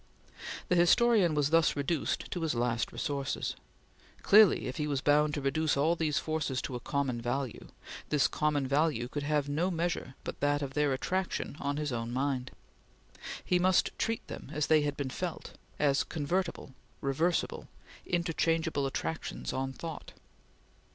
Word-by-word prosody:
The 180 - +3
historian 180 0 +4
was 145 0 +1
thus 165 -1 +4
reduced 145 +1 -1
to 175 - -3
his 160 -5 0
last 120 -1 0
resources. 140 -2 -2 0.7
Clearly 210 -3 +6
if 130 - -4
he 150 - -1
was 140 -2 0
bound 150 +1 +3
to 145 - -2
reduce 150 +2 +1
all 160 +5 +3
these 155 -3 0
forces 155 -5 -1
to - - -4
a - - -3
common 130 -2 -1
value, 125 +1 -3 0.4
this 150 -2 +3
common 150 -2 0
value 140 -3 +1
could 145 +3 -4
have 145 -1 0
no 160 +6 0
measure 170 -6 -2
but - - -6
that 145 0 +1
of 135 -1 -5
their 150 0 +2
attraction 185 +3 -2
on 140 0 -2
his 150 -2 -2
own 115 -1 -3
mind. 130 0 -1 1.0
He 180 - +2
must 185 0 +3
treat 225 0 -1
them - - -8
as 150 0 0
they 155 -1 +4
had 145 -1 -2
been 135 -2 -3
felt; 175 +3 -4 0.3
as 140 -2 +3
convertible, 165 -1 -2 0.3
reversible, 155 +6 0 0.4
interchangeable 165 -4 0
attractions 160 +4 -4
on 135 0 -2
thought. 160 +4 -7
150 Hz, 160 wpm, -31 LUFS, 135-165 Hz, 1.0 s, Clearly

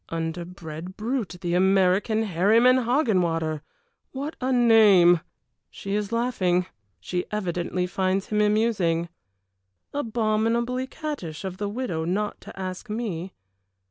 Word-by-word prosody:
Underbred 165 +1 -6
brute, 225 -4 -2
the 175 -2 -2
American, 190 +4 +3
Herryman 220 +7 +4
Hoggenwater! 175 - +1 0.5
What 285 +4 -4
a 260 +1 0
name! 215 -8 +6 0.5
She 195 - -6
is 210 0 -1
laughing 195 -7 +1 0.3
she 180 - -3
evidently 180 -3 -2
finds 190 +1 -1
him 210 0 +1
amusing. 205 -6 +1 0.8
Abominably 235 0 0
cattish 270 - -6
of 185 -1 -5
the 205 0 -2
widow 205 -8 -3
not 200 +5 -2
to - - -11
ask 185 +4 -5
me. 195 -5 -4
195 Hz, 110 wpm, -25 LUFS, 175-230 Hz, 0.8 s, name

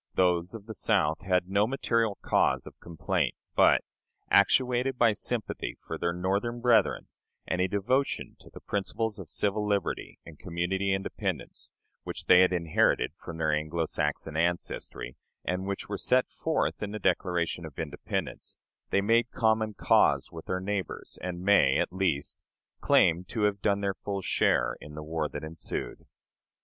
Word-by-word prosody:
Those 90 +1 +2
of 105 -3 -9
the 110 - -7
South 80 -5 +1
had 90 0 +1
no 100 +3 +2
material 115 -5 0
cause - - +2
of - - -12
complaint; 85 -2 -1 0.2
but, - - +5 0.5
actuated 125 +5 +3
by 120 -2 +5
sympathy 115 +1 -3
for 80 - -4
their 85 +2 -1
Northern 100 +7 -1
brethren, 120 -1 +3 0.4
and 90 - 0
a 95 - +3
devotion 120 +9 -1
to - - -16
the - - -12
principles 105 +2 -2
of 95 - -9
civil 105 +1 0
liberty 100 -2 -2
and 80 -2 -12
community 95 +3 -1
independence, 95 0 -3 0.3
which - - -7
they 90 - +7
had 95 - +4
inherited 85 -3 +2
from 85 - -7
their 80 -1 +1
Anglo 80 +2 -1
Saxon 75 +1 -2
ancestry, 85 +2 -2 0.3
and 90 +1 -2
which 100 0 -4
were 100 - -3
set 125 0 +3
forth 160 -1 -1
in 105 - -2
the - - -2
Declaration 90 -2 0
of 80 -4 -9
Independence, - - -4 0.3
they 100 - +2
made 115 +3 +3
common 110 -1 +1
cause - - +3
with 80 -1 -9
their 90 - -1
neighbors, 95 -2 -4
and 90 -1 -5
may, 95 -9 +5
at - - -1
least, 90 -7 -1 0.4
claim 85 +2 +4
to 110 +3 -3
have 100 -1 +1
done 100 -1 +1
their 100 -1 0
full 100 0 -5
share - - +2
in 75 0 -10
the 75 - -6
war 80 -1 -2
that 75 - -6
ensued. 80 +1 -5
95 Hz, 160 wpm, -28 LUFS, 85-105 Hz, 0.5 s, they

